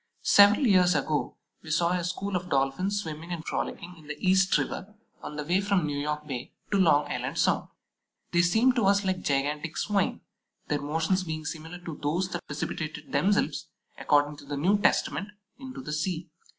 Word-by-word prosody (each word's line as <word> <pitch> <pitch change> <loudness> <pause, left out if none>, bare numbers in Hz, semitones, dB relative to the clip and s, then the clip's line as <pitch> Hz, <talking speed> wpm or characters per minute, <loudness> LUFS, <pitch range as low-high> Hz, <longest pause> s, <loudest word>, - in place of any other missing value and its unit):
Several 205 +6 +6
years 180 -5 +5
ago 145 0 -1 0.2
we 160 - -11
saw 170 +2 +2
a 180 -1 0
school 185 +3 -3
of 180 0 -3
Dolphins 140 +9 +1
swimming 160 +2 -7
and 165 -2 -4
frolicking 180 +1 -4
in 155 - -16
the 150 0 -5
East 190 +3 +3
River 210 +3 -4 0.3
on 150 - -7
the 150 - -3
way 180 +5 +2
from 200 -4 +1
New 145 -1 -2
York 150 +1 -3
Bay 130 -3 -6 0.2
to 200 - +2
Long 150 -5 +4
Island - - -4
Sound. - - +2 0.6
They 175 - +4
seemed 220 +9 +3
to 220 -5 +3
us 200 0 +3
like 185 -1 0
gigantic 145 +3 -1
Swine, 200 -2 0 0.5
their 150 - 0
motions 160 +6 0
being 155 -2 -5
similar 160 +2 -6
to 165 -3 -7
those 170 +6 0
that 175 -1 -6
precipitated 155 +1 -5
themselves, 160 -8 +1 0.3
according 145 0 +2
to 145 - -13
the 145 0 -4
New 190 +8 +3
Testament, 205 0 +1 0.3
into 265 -1 -8
the 150 - -5
sea. 160 +1 -2
170 Hz, 185 wpm, -27 LUFS, 150-190 Hz, 0.6 s, Several